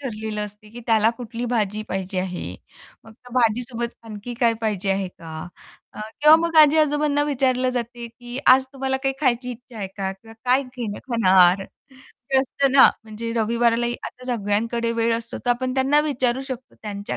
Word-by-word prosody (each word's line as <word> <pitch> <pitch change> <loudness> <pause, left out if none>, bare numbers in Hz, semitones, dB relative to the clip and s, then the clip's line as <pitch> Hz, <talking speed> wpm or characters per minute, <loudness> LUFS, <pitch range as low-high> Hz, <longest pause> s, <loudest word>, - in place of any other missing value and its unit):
ठरलेलं 215 -5 -4
असते, 210 +1 -12
की 240 +2 -10
त्याला 225 0 +4
कुठली 240 0 -6
भाजी 215 -2 0
पाहिजे 190 0 -3
आहे? 185 -1 -4 0.6
मग 225 - -14
त्या 245 +1 -17
भाजीसोबत 235 0 0
आणखी 220 +2 -7
काय 230 -1 +4
पाहिजे 205 -3 -1
आहे 195 -1 0
का? 165 -2 -12 0.6
अ, - - -9 0.2
किंवा 300 +2 +8
मग 330 - -3
आजी-आजोबांना 295 -1 +4
विचारलं 255 -3 +1
जाते, 240 -1 -4
की 245 +2 -9
आज 260 +1 +7
तुम्हाला 265 0 -1
काही 270 -1 0
खायची 250 -2 +1
इच्छा 245 0 -11
आहे 195 - -4
का? 195 -1 -2
किंवा 225 +4 -16
काय 255 +2 +3
घेणं 245 -5 -6
खाणार? 190 -4 +5
ते 265 -1 -5
असतं 270 0 0
ना, 275 - +8 0.2
म्हणजे 225 +1 -6
रविवारालाही 235 +1 +1
आता 250 - -11
सगळ्यांकडे 230 +2 -1
वेळ 230 0 +1
असतो 230 0 -6
तर 245 - +1
आपण 255 +1 -1
त्यांना 270 +3 +3
विचारू 260 -4 0
शकतो, 260 -1 -7
त्यांच्या 205 -1 -5
235 Hz, 170 wpm, -22 LUFS, 215-260 Hz, 0.6 s, किंवा